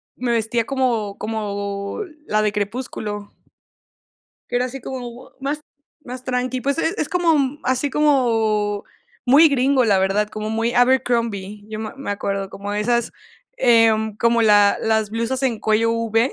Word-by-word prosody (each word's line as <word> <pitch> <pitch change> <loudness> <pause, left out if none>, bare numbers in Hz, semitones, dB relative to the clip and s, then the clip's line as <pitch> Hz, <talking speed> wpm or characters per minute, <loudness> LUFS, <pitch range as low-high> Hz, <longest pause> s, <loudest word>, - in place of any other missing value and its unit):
me 245 -1 -2
vestía 230 0 0
como 235 -7 -1
como 200 - -4 0.2
la 215 0 +1
de 210 -1 0
crepúsculo. 205 -1 -4 1.2
Que - - -1
era 250 - +1
así 265 +2 -7
como 250 0 -8
más 285 +2 -2 0.4
más 250 0 -7
tranqui, 255 0 -2
pues 280 +4 -1
es 330 - 0
es 300 - -1
como, 345 -3 +2
mm, 280 0 -1
así 260 +2 0
como 225 -8 +1 0.4
muy 285 +6 +7
gringo, 265 -2 +2
la 200 -3 +3
verdad, 195 +2 +1
como 215 0 -5
muy 225 +2 0
Abercrombie, 230 -5 +1
yo 215 0 -5
me 220 - -5
me 275 - -5
acuerdo, 195 -1 -3
como 200 +1 -6
esas, 235 +3 0 0.4
em, 225 -3 +3
como 235 +1 +2
la 205 -2 +5
las 220 -2 +1
blusas 230 +4 -2
en 245 -4 0
cuello 220 +2 +2
v, 230 +2 +1
230 Hz, 155 wpm, -21 LUFS, 210-255 Hz, 1.2 s, muy